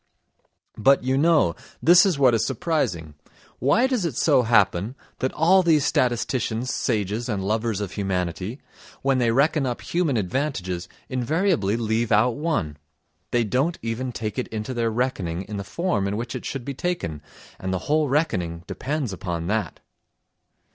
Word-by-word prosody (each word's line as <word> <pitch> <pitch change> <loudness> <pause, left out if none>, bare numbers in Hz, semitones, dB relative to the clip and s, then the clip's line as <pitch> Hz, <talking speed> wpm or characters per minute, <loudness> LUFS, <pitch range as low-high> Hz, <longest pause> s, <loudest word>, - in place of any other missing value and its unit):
But, 135 +5 +4
you 130 +1 +1
know, 150 - +4 0.3
this 175 +4 +6
is 180 -6 0
what 130 -3 +5
is 115 - +2
surprising: 110 - -1 0.5
why 145 - +3
does 255 -6 0
it 165 -8 -2
so - - +4
happen 110 -1 +2 0.2
that 130 - 0
all 180 +4 +5
these 160 -5 +3
statisticians, 120 -2 0
sages 110 +1 -1
and 100 -4 -1
lovers 110 0 0
of 100 -3 -4
humanity, 95 - -3 0.4
when 135 -1 +2
they 120 -2 +2
reckon 140 +3 +2
up 120 - -3
human 165 -7 0
advantages 95 - -2 0.2
invariably 130 - +1
leave 115 0 0
out 110 +4 +4
one? 145 - -2 0.5
They 120 -1 +2
don't 135 +10 0
even 115 +3 -3
take 110 +1 -4
it 125 - -2
into 110 +3 -4
their 115 -2 0
reckoning 105 -8 -2
in 105 +1 -6
the 100 - -3
form 105 - -1
in 100 +1 -2
which 115 +1 -4
it - - -6
should 135 -3 -4
be 140 - -3
taken, 125 - -3 0.4
and 95 - -3
the 95 - 0
whole 150 -1 +2
reckoning 90 - 0
depends 140 -6 -3
upon 85 -2 -4
that. 105 -6 -2
120 Hz, 160 wpm, -24 LUFS, 100-145 Hz, 0.5 s, this